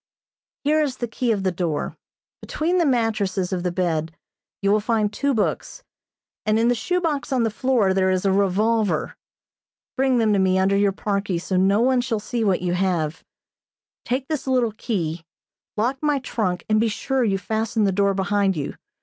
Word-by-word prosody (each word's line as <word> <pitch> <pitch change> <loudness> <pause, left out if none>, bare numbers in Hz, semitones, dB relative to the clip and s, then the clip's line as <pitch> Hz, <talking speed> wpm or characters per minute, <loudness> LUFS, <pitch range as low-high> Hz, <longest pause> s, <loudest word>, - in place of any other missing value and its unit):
"Here 305 +2 +3
is 280 -4 -1
the 240 - -3
key 235 +1 -1
of 200 -3 -1
the 185 - +1
door. 165 -4 -2 0.5
Between 345 +4 -1
the 335 - +3
mattresses 215 -7 0
of 180 - -1
the 180 0 -1
bed 165 -3 -2 0.5
you 200 - +3
will 210 - +4
find 210 -1 0
two 280 +4 0
books, 225 - -2 0.6
and 215 0 +2
in 230 +1 +3
the - - +4
shoe 360 +10 -1
box 305 -6 -2
on 255 -3 +2
the 225 - 0
floor 230 -5 +2
there 190 0 +2
is 185 +1 0
a 195 - +3
revolver. 200 -1 +1 0.8
Bring 265 -1 +2
them 220 -2 +3
to 200 - +2
me 190 0 +3
under 190 +1 +2
your 200 0 +3
parkie 200 -2 -2
so 185 +2 -3
no 195 +3 +3
one 255 0 +3
shall 240 -3 -2
see 230 +2 -3
what 190 -4 +1
you 175 -1 0
have. 175 -4 -1 0.8
Take 260 +2 -2
this 305 -4 -3
little 250 -3 +2
key, 170 -9 -3 0.5
lock 250 +5 0
my 295 -2 +2
trunk 210 -8 -2
and 215 0 +3
be 230 - +2
sure 260 +4 -1
you 200 -4 +1
fasten 220 +3 -1
the 200 - +3
door 200 +1 +1
behind 195 -1 +1
you. 145 - -4
210 Hz, 190 wpm, -23 LUFS, 190-245 Hz, 0.8 s, will